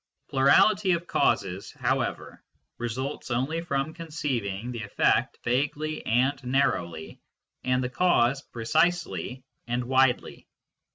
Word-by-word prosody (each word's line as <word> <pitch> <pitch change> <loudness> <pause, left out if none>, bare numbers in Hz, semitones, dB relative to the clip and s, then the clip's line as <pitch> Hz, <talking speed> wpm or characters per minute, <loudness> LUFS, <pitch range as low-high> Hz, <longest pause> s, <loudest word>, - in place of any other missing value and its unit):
Plurality 185 +9 +4
of 170 0 -2
causes, 95 - 0
however, - - -2 0.4
results 130 +5 -4
only 135 +7 -1
from 140 -2 -2
conceiving 125 - -3
the 120 -2 -5
effect 105 -1 +1
vaguely 145 +5 -1
and 130 +4 +1
narrowly 125 - -1 0.4
and 130 0 +1
the 125 - -2
cause 135 -3 +2
precisely 125 - -1 0.2
and 120 +1 -1
widely. 130 0 +1
130 Hz, 105 wpm, -27 LUFS, 120-150 Hz, 0.4 s, Plurality